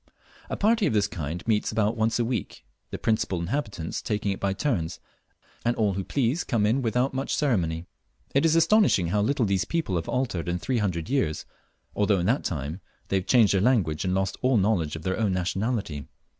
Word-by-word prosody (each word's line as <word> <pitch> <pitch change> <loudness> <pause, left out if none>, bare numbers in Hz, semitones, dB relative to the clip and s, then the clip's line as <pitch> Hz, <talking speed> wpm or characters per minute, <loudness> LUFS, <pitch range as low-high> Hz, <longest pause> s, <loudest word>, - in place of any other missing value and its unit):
A - - -3
party 220 0 +3
of - - 0
this 105 -2 +2
kind 85 0 -5
meets 105 -2 +1
about 110 0 +1
once 110 0 +1
a 120 - +1
week, 115 - -4 0.2
the - - -5
principal 110 -5 0
inhabitants 90 - -3
taking 105 -3 -1
it 95 - -4
by 100 - 0
turns, 95 - -1 0.6
and 120 +1 +1
all 105 -3 +1
who 95 0 -3
please 135 - 0
come 115 -5 +1
in 115 +6 +2
without 125 +3 0
much 135 +1 -1
ceremony. 90 - 0 0.5
It 140 - +3
is 165 -1 +4
astonishing 165 - +4
how 105 +3 +1
little 120 +3 +1
these 95 -2 +1
people 160 - -1
have 80 - -4
altered 115 -10 -1
in 85 - 0
three 125 +6 -1
hundred 90 -5 -1
years, 125 - 0 0.5
although 105 -1 +2
in 90 - -1
that 120 +8 +1
time 75 +3 -4 0.3
they 95 - +2
have 95 - -3
changed 115 -6 +5
their 95 - +2
language 95 -11 +2
and 90 0 0
lost 95 0 -1
all 130 -1 +3
knowledge 95 -7 +1
of 80 - -7
their 95 +3 -1
own 105 -4 +1
nationality. 95 - -2
105 Hz, 205 wpm, -26 LUFS, 90-125 Hz, 0.6 s, changed